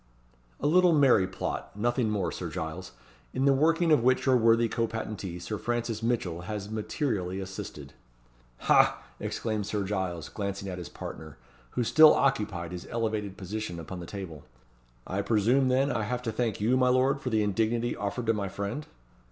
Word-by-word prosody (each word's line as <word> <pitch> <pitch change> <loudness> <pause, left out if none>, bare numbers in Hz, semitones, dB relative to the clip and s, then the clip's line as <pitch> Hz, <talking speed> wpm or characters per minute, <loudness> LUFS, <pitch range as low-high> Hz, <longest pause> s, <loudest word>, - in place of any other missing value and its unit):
"A - - -4
little 175 +3 +5
merry 130 -10 +5
plot; 95 +1 -5
nothing 120 +1 +1
more, 95 -6 -1
Sir - - -5
Giles 90 +4 -5 0.4
in 130 +1 +1
the 140 - +6
working 165 +4 +3
of 150 - +5
which 130 +2 +2
your 130 -1 +5
worthy 115 0 +4
co 115 +1 -1
patentee, 105 -5 -5
Sir 105 +4 -5
Francis 120 -2 -2
Mitchell, 110 -8 -1
has 105 +3 -5
materially 105 - -2
assisted." 95 0 -7 0.7
"Ha!" - - +4 0.2
exclaimed 110 -3 -2
Sir 105 -1 -1
Giles, 95 -5 -3
glancing 100 -1 -4
at 90 -1 -5
his 85 - -7
partner, 80 -1 -8 0.4
who 125 - +3
still 155 +6 +7
occupied 105 -10 0
his 90 -1 -7
elevated 110 -4 -2
position 100 -2 -5
upon 90 +3 -7
the 85 - -8
table 90 -8 -7 0.6
"I 100 +2 -2
presume, 115 +6 +3
then, 135 +2 +2
I - - 0
have 125 +3 -2
to 115 - -2
thank 115 -1 -1
you, 115 +5 +2
my 130 -1 +4
lord, 130 +2 +2
for 125 - -2
the 110 -2 +2
indignity 115 +4 0
offered 100 +4 -3
to 115 - +3
my 100 -3 -2
friend?" 100 +10 -4
110 Hz, 175 wpm, -28 LUFS, 95-125 Hz, 0.7 s, still